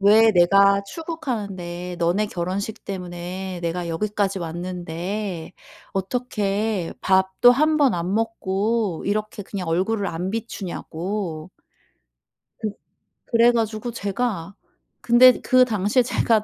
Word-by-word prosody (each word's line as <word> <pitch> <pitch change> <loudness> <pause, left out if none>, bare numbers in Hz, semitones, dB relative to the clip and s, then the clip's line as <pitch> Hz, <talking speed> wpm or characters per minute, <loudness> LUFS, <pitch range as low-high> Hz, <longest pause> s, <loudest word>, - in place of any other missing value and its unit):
왜 215 +2 +6
내가 200 +3 +5
출국하는데 200 - -5
너네 175 +5 +1
결혼식 200 +4 -4
때문에 180 0 -5
내가 170 +1 -2
여기까지 200 +3 -1
왔는데 175 +2 -4 0.4
어떻게 205 -2 -1
밥도 190 +5 +4
1 305 +4 +3
번 280 -7 +4
안 175 +2 -2
먹고 215 -3 -1
이렇게 210 +1 -2
그냥 190 -3 -5
얼굴을 195 +5 0
안 175 +2 -3
비추냐고. 185 -5 -4 1.1
그 215 - -1 0.6
그래 235 0 +5
가지고 225 0 -1
제가 200 -4 -3 0.5
근데 245 +1 +6
그 255 0 +5
당시에 215 +2 +2
제가 225 -2 +2
200 Hz, 230 characters per minute, -23 LUFS, 180-225 Hz, 1.1 s, 왜